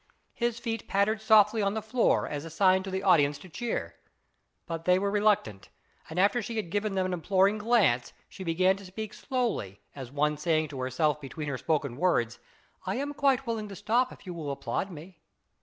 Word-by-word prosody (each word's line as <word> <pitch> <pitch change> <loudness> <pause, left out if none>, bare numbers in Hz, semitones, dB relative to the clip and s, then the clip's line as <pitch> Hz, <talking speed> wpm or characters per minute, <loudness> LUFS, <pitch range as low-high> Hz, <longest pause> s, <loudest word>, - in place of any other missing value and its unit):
His 235 -1 -1
feet 225 -3 -4
pattered 210 +3 +1
softly 215 0 +5
on 200 +1 0
the - - 0
floor, 235 +2 +2
as 145 -1 -4
a 165 - -7
sign 185 +3 +3
to 190 - -6
the 190 +1 -3
audience 145 -6 +4
to 185 - -13
cheer, 160 - -4 0.7
but 165 -1 -5
they 180 0 +5
were 200 +1 0
reluctant, 205 - +1 0.4
and 160 - -7
after 200 +5 +3
she 230 +1 -5
had 210 -7 -3
given 205 0 -1
them 190 -1 +1
an 185 - -2
imploring 195 +4 +2
glance, 200 - +2 0.2
she 190 - -9
began 185 +3 +2
to 200 - -11
speak 210 +3 -6
slowly, 230 - -2 0.2
as 130 -3 -8
one 150 +1 +1
saying 155 0 +1
to 135 -2 -7
herself 150 +4 0
between 150 +2 -6
her 135 - -2
spoken 140 -4 -1
words, 120 -9 +1 0.2
" - - -37
I - - 0
am 280 +3 -2
still 290 - -9
quite 270 -2 +3
willing 225 -3 -3
to 195 - -8
stop 230 +6 +1
if - - -14
you 180 - -6
will 160 -4 -5
applaud 140 +7 -3
me." 170 0 -11
190 Hz, 210 wpm, -28 LUFS, 150-215 Hz, 0.7 s, softly